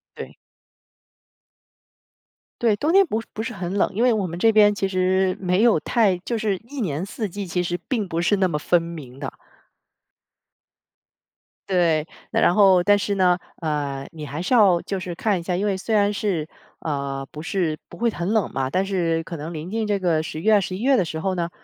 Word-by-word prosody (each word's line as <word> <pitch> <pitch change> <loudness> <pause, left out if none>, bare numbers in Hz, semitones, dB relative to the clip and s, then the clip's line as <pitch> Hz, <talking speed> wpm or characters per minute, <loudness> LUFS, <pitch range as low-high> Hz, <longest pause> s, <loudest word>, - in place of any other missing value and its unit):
对。 - - -8 2.3
对， 225 -3 +4
冬 300 +8 0
天 390 +1 +5
不 225 -6 -1
是 - - -13
不 220 - -3
是 - - -4
很 185 -1 -4
冷。 200 - +2
因 225 - 0
为 245 -1 +5
我 205 -4 0
们 170 0 -6
这 225 +5 +4
边 210 -1 +5
其 195 -1 -1
实 185 0 +1
没 185 +2 +1
有 235 -7 +5
太 215 -6 +2
就 230 +6 -3
是 210 -3 0
一 285 -2 -6
年 165 -3 -2
四 210 +1 -4
季， 200 +1 -6
其 180 +1 -1
实 175 0 -2
并 220 -8 -1
不 165 0 -2
是 205 +4 +3
那 190 -1 +2
么 150 -3 -1
分 175 +3 +2
明 155 -6 -9
的。 135 - -4 2.4
对， 165 -4 +2 0.2
那 - - +1
然 175 - +4
后 190 -4 +6
但 205 0 +5
是 200 0 -1
呢， 180 -2 +4 0.2
呃， 145 -4 -2
你 155 -2 -8
还 145 +3 -5
是 185 +8 0
要 190 -7 +5
就 195 -1 -4
是 180 -1 -5
看 205 0 +1
一 - - -8
下， 175 0 -2
因 200 - -1
为 200 -2 0
虽 215 +4 -2
然 205 0 +3
是， 180 -7 -2 0.3
呃， 140 -3 -3
不 150 - -7
是 165 -3 -1
不 - - -12
会 235 0 +2
很 175 -5 -3
冷 220 -4 +1
嘛， 130 -1 -2
但 190 +4 0
是 170 -4 0
可 170 - -6
能 155 +3 -6
临 160 +1 -6
近 220 +2 -2
这 205 -1 0
个 165 -4 +1
十 155 - -6
月、 210 +2 +4
十 185 -1 -4
一 205 - -6
月 270 0 +4
的 185 - +2
时 160 -1 -5
候 190 +2 -1
呢， 170 -1 -2
185 Hz, 235 characters per minute, -23 LUFS, 165-205 Hz, 2.4 s, 后